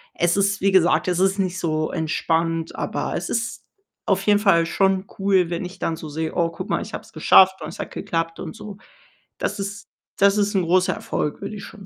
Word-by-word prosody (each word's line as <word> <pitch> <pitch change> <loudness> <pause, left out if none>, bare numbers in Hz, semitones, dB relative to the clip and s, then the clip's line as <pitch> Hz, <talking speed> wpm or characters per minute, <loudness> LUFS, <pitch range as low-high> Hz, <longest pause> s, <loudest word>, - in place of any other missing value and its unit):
es 175 +1 +2
ist, 200 +1 +2
wie 195 +1 +3
gesagt 185 -1 +3
es 180 0 +1
ist 195 +1 +2
nicht 185 -1 -1
so 155 -2 -1
entspannt, 165 0 -1
aber, - - -3
es - - -3
ist 235 0 -2 0.4
auf 195 0 +1
jeden 205 -1 +4
Fall 180 -5 +4
schon 190 +2 +1
cool, 190 -3 +2
wenn 170 +1 -2
ich 180 +2 -9
dann 165 - -1
so 155 -1 -8
sehe: 160 +2 -3
„Oh, 170 -2 +2
guck 165 - -8
mal, - - 0
ich - - -8
habe - - -5
es - - -19
geschafft 190 -1 +5
und 155 - -5
es - - -11
hat - - -5
geklappt“, 165 0 -3
und 160 -4 -7
so. 205 -2 -9 0.6
Das - - -2
ist 200 +1 -5 0.3
das 200 +1 +4
ist 205 0 +1
'n 185 - +2
großer 180 +2 +2
Erfolg, 150 - -3
würde 215 - -5
ich 205 - -8
schon 200 -3 -12
185 Hz, 230 wpm, -22 LUFS, 165-195 Hz, 0.6 s, geschafft